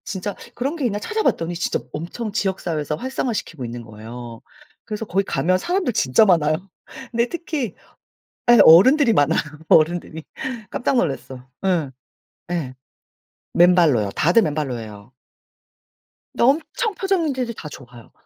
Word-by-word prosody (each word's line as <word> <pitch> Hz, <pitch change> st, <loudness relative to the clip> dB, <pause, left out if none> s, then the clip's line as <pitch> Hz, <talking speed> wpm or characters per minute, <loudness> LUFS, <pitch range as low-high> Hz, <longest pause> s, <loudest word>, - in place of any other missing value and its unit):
진짜 195 Hz, +1 st, -4 dB, 0.2 s
그런 275 Hz, +6 st, -2 dB
게 295 Hz, -6 st, -2 dB
있나 205 Hz, -3 st, -1 dB
찾아봤더니 190 Hz, -, -1 dB
진짜 175 Hz, -, -1 dB
엄청 180 Hz, +8 st, -5 dB
지역사회에서 175 Hz, -7 st, -2 dB
활성화시키고 225 Hz, -, -4 dB
있는 120 Hz, 0 st, -7 dB
거예요. 115 Hz, +2 st, -10 dB, 0.4 s
그래서 215 Hz, 0 st, -5 dB
거기 195 Hz, 0 st, 0 dB
가면 175 Hz, +1 st, +1 dB
사람들 350 Hz, -, -1 dB
진짜 130 Hz, +5 st, +4 dB
많아요. 160 Hz, -5 st, +3 dB, 0.6 s
근데 235 Hz, 0 st, +1 dB
특히 310 Hz, -, -4 dB, 0.8 s
예 240 Hz, -, +7 dB
어른들이 235 Hz, -, +7 dB
많아요, 145 Hz, -7 st, +3 dB, 0.3 s
어른들이. 160 Hz, 0 st, +2 dB, 0.5 s
깜짝 250 Hz, -, 0 dB
놀랐어. 135 Hz, -, -3 dB, 0.2 s
예. 170 Hz, -8 st, +1 dB, 0.6 s
예. 145 Hz, -7 st, -3 dB, 0.8 s
맨발로요. 170 Hz, -, +4 dB
다들 175 Hz, +9 st, +4 dB
맨발로 145 Hz, -5 st, -2 dB
해요. 105 Hz, 0 st, -11 dB, 1.2 s
근데 -, -, 0 dB
엄청 320 Hz, -, +1 dB
표정 385 Hz, -2 st, 0 dB
문제들이 260 Hz, -6 st, -2 dB
다 155 Hz, -, -7 dB
좋아요. 125 Hz, -4 st, -13 dB
175 Hz, 315 characters per minute, -21 LUFS, -, 1.2 s, 예